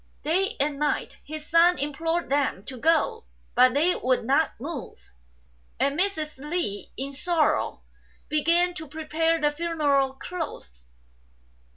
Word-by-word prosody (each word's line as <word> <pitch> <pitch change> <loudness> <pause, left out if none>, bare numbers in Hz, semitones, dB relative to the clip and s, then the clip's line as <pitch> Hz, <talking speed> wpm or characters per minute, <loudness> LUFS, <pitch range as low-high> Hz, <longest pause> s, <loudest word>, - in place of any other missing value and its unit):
Day 385 +8 +1
and 285 0 0
night 300 0 -1
his 305 +1 -7
son 340 +2 +5
implored 325 +5 -1
them 275 -8 0
to 260 - -7
go, 330 - +1 0.3
but 255 +1 +5
they 330 +5 +3
would 255 -2 0
not 280 +3 +1
move; 285 0 -6 0.8
and 280 0 +2
Mrs. 315 -6 -1
Li 295 - -3
in 275 +2 -4
sorrow 320 +2 +1 0.4
began 340 +4 +2
to 315 -2 -7
prepare 320 +2 0
the 295 -1 +2
funeral 295 -4 +1
clothes. 265 - -7
305 Hz, 130 wpm, -26 LUFS, 275-335 Hz, 0.8 s, son